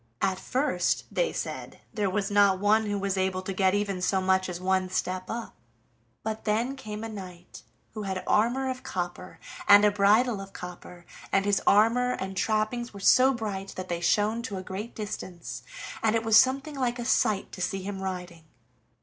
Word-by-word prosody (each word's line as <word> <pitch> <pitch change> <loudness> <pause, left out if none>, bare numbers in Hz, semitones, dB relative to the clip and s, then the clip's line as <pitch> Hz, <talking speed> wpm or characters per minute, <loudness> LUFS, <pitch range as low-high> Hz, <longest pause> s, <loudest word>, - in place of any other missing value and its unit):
At 190 -1 +1
first, 255 -7 0
they - - +1
said, - - -5
there 205 -3 0
was 195 +1 -1
not 200 -2 +5
one 210 +2 +3
who 205 0 -1
was 195 -1 -1
able 185 0 0
to 195 - -4
get 190 0 +2
even 200 -3 -1
so 190 +1 +2
much 190 0 +1
as 175 -1 -5
one 185 0 +1
step 185 0 -2
up, 230 0 -5 0.7
but 220 0 -4
then 230 +5 0
came 215 -5 -7
a - - -3
knight 185 -5 -10 0.3
who 215 - -5
had 190 -2 -3
armor 240 +5 +2
of 255 -1 -3
copper, 180 0 -5 0.3
and 205 0 +8
a 210 - +5
bridle 205 +2 +3
of 195 0 -10
copper, 180 -1 -10 0.3
and 195 0 +2
his 205 -1 +2
armor 235 +4 +4
and 190 -3 -5
trappings 215 +3 -1
were - - -7
so 255 +7 +6
bright 205 -5 -4
that 185 0 -6
they 170 -1 -2
shone 210 +6 +2
to 225 -5 -5
a 185 - -5
great 200 +5 -6
distance, 185 -5 -6 0.4
and 220 0 +2
it 225 - +1
was 225 -1 +3
something 270 +6 +4
like 250 -2 -1
a 240 - -4
sight 210 -4 +1
to 185 - -8
see 195 +1 -2
him 195 0 -5
riding. 180 -3 -6
200 Hz, 190 wpm, -27 LUFS, 185-225 Hz, 0.7 s, and